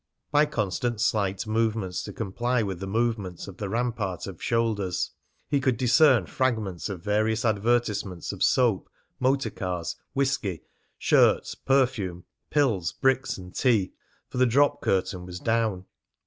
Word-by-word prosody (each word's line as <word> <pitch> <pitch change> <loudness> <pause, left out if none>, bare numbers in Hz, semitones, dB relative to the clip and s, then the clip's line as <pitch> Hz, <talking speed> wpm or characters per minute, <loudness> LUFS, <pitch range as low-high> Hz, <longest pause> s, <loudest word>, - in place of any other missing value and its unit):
By 150 +1 +4
constant 115 -2 -2
slight 100 -3 0
movements 110 -4 0
to - - -6
comply 120 +3 -1
with 95 -4 -4
the 95 - -5
movements 105 -4 -1
of 100 -1 -10
the 100 -1 -4
rampart 110 -5 -2
of 95 -4 -9
shoulders, 110 -6 0 0.4
he 140 -1 +1
could 130 -3 +1
discern 130 +1 +5
fragments 110 -10 -1
of 95 -4 -6
various 110 +3 +1
advertisements 105 -4 0
of - - -9
soap, 120 -8 +2 0.3
motor 135 +2 +1
cars, 90 -3 -4 0.2
whisky, 135 - -1 0.3
shirts, - - +3
perfume, 120 -10 0 0.3
pills, 115 - +1
bricks, 135 0 +1
and 90 -1 -10
tea, 110 -7 +2 0.3
for 125 - -5
the 130 - +5
drop 145 +4 +3
curtain 95 -1 0
was 90 0 -7
down. 110 -4 0
110 Hz, 140 wpm, -26 LUFS, 95-125 Hz, 0.4 s, discern